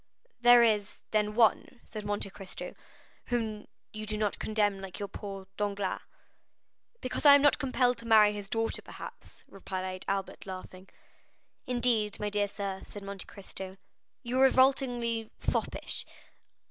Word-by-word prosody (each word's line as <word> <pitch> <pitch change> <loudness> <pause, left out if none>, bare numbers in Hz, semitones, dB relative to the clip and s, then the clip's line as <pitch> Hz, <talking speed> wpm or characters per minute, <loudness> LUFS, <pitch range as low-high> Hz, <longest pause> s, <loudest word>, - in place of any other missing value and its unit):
"There 240 0 +8
is, 210 -3 +1
then, 210 -1 +1
one," 235 +2 +3
said 215 -1 -7
Monte 205 -1 -1
Cristo, 195 -1 -7 0.5
"whom 220 -3 -2 0.3
you 215 0 -6
do 215 0 -1
not 210 -1 -1
condemn 205 -2 +1
like 190 -2 -7
poor 195 -2 -7
Danglars?" 205 -2 -1 1.0
"Because 255 - -2
I 285 -1 +10
am 285 - +4
not 290 - +5
compelled 255 -3 +2
to 230 - -9
marry 215 -2 +7
his 205 -1 -7
daughter 225 +1 0
perhaps," - - -11
replied 185 -1 -5
Albert, 195 0 -3
laughing. 185 0 -8 0.8
"Indeed, 240 -4 +1
my 210 0 -2
dear 205 0 +1
sir," 195 -1 -4
said 205 - -8
Monte 200 -1 -6
Cristo, 190 -1 -8 0.5
"you 250 +1 -1
are - - +7
revoltingly 245 -4 +2
foppish." - - -2
210 Hz, 140 wpm, -30 LUFS, 195-235 Hz, 1.0 s, I